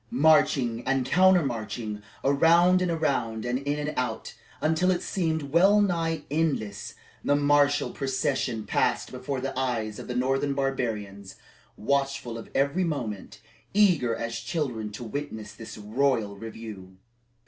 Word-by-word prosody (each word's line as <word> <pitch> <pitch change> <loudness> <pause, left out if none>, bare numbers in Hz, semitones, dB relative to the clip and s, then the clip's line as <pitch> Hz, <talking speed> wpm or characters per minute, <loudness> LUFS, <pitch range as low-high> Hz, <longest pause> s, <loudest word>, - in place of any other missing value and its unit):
Marching 130 -4 +3
and 135 -1 +1
counter 180 +3 +5
marching, 110 -3 -4 0.2
around 170 +6 +5
and 180 - +1
around, 130 -9 -1
and 120 +1 0
in 145 +1 -2
and 150 - -4
out, 125 -3 -3 0.3
until 160 +4 +2
it 180 -1 +1
seemed 160 -6 -2
wellnigh 175 -3 +3
endless, 145 -11 -1 0.3
the 145 - +3
martial 145 0 +3
procession 135 -4 -1
passed - - 0
before 130 +1 -4
the 135 +1 -4
eyes 120 -5 -2
of - - -8
the 125 - -4
northern 135 +2 0
barbarians, 105 -8 -3 0.4
watchful 135 -1 -1
of - - -11
every 140 +7 +2
movement, 125 - -4 0.3
eager 170 - +4
as 115 0 -4
children 120 -4 -3
to 110 - -7
witness 110 -4 -6
this 115 - -10
royal 110 -1 0
review. 105 -3 -9
135 Hz, 135 wpm, -27 LUFS, 115-155 Hz, 0.4 s, counter